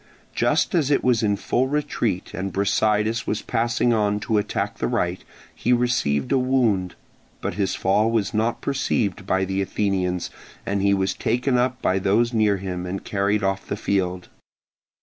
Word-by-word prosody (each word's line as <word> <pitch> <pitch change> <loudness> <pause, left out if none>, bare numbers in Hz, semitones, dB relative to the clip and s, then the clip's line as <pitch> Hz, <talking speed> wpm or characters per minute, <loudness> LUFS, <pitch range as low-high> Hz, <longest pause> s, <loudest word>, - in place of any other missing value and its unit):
Just - - +1
as 155 -6 +2
it 145 - +2
was 125 -3 +3
in 105 -2 +2
full 125 +5 0
retreat 120 -9 -2
and 95 +1 -3
Brasidas 105 +3 +1
was 105 - -2
passing 120 +1 +1
on 105 -2 +1
to 110 -1 +1
attack 105 - -3
the - - 0
right, - - -1 0.3
he 120 - -1
received 120 - +1
a 135 - +4
wound; 120 -8 +1 0.4
but - - -3
his 100 -2 -1
fall 105 +4 +2
was 115 -2 0
not 110 +2 0
perceived 105 -8 -1
by 95 0 +1
the 95 +1 -1
Athenians, 95 -3 -1 0.3
as 100 0 -1
he 100 0 +3
was 95 0 0
taken 125 +2 0
up 125 +1 0
by 95 +1 +2
those 110 +5 +2
near 105 -3 +3
him 90 -1 -5
and 95 +2 -4
carried 100 +1 0
off 95 0 -1
the 100 - -3
field. 90 -3 -1
105 Hz, 170 wpm, -23 LUFS, 95-120 Hz, 0.4 s, a